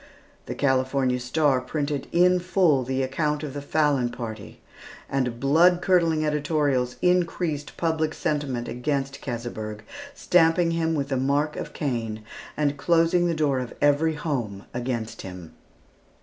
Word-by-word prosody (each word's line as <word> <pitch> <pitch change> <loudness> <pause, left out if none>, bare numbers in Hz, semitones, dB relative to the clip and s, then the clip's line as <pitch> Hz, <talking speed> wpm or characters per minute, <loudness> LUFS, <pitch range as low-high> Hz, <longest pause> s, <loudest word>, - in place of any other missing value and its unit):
The - - -4
California 130 -1 +1
Star 130 +1 +1
printed 145 +1 -3
in 180 +1 +4
full 180 -6 +2
the 130 +1 -1
account 150 +3 -1
of 145 -3 -5
the 145 - -5
Fallon 145 -4 +1
party, 115 -3 -7 0.5
and 125 -4 -1
blood 165 +6 +4
curdling 165 -4 +2
editorials 145 -4 0
increased 175 -4 0
public 160 -2 0
sentiment 140 -5 -2
against 135 +2 -2
Keseberg, 115 -4 -5 0.3
stamping 165 -3 +3
him 165 -1 0
with 140 -2 -2
the 135 - 0
mark 140 +3 0
of - - -6
Cain, 115 -6 -3 0.3
and 145 -1 0
closing 170 +3 +3
the 170 - 0
door 145 -4 +1
of 125 -2 -6
every 150 +2 +3
home 120 - -3
against 120 -2 -3
him. 90 -3 -9
145 Hz, 135 wpm, -25 LUFS, 125-160 Hz, 0.5 s, in